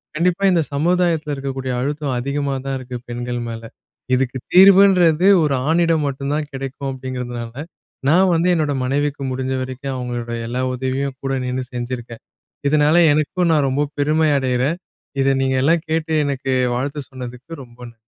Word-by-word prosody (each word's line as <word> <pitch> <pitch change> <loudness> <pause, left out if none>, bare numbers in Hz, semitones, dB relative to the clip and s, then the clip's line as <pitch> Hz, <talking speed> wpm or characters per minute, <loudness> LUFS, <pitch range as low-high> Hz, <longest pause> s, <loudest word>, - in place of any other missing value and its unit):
கண்டிப்பா 180 +4 +1
இந்த 170 -2 +3
சமுதாயத்துல 165 -1 +1
இருக்கக்கூடிய 135 -1 -4
அழுத்தம் 145 0 -2
அதிகமா 140 +2 -2
தான் 135 0 -2
இருக்கு 125 -1 -6
பெண்கள் 120 0 -4
மேல. 115 0 -6 0.5
இதுக்கு 130 0 +1 0.2
தீர்வுன்றது 185 -3 +6 0.2
ஒரு 150 -2 +1 0.2
ஆணிடம் 165 -1 +2
மட்டும் 140 0 -3
தான் 150 -1 -3
கிடைக்கும் 135 +1 -5
அப்படிங்கிறதுனால, 125 -3 -6 0.6
நான் 185 +3 +4
வந்து 165 +2 +2
என்னோட 155 -4 0
மனைவிக்கு 140 +1 -1
முடிஞ்ச 130 0 -2
வரைக்கும் 130 +1 -5
அவங்களோட 120 -2 -4 0.2
எல்லா 125 +2 -2
உதவியும் 130 +1 -2
கூட 135 0 -1
நின்னு 125 +1 -2
செஞ்சிருக்கேன். 120 -1 -6 0.5
இதுனால 150 +1 +3 0.2
எனக்கும் 160 +4 +1
நான் 145 -3 +2
ரொம்ப 145 +2 0
பெருமை 155 +2 +2
அடையறேன், 130 +5 0 0.4
இதை 135 - +3
நீங்க 130 0 +1
எல்லாம் 165 +3 +2
கேட்டு 160 0 -1
எனக்கு 135 -1 -2 0.2
வாழ்த்து 140 +3 -4
சொன்னதுக்கு 130 +4 -8
ரொம்ப 120 -1 -18
ந - - -24
140 Hz, 150 wpm, -20 LUFS, 130-155 Hz, 0.6 s, தீர்வுன்றது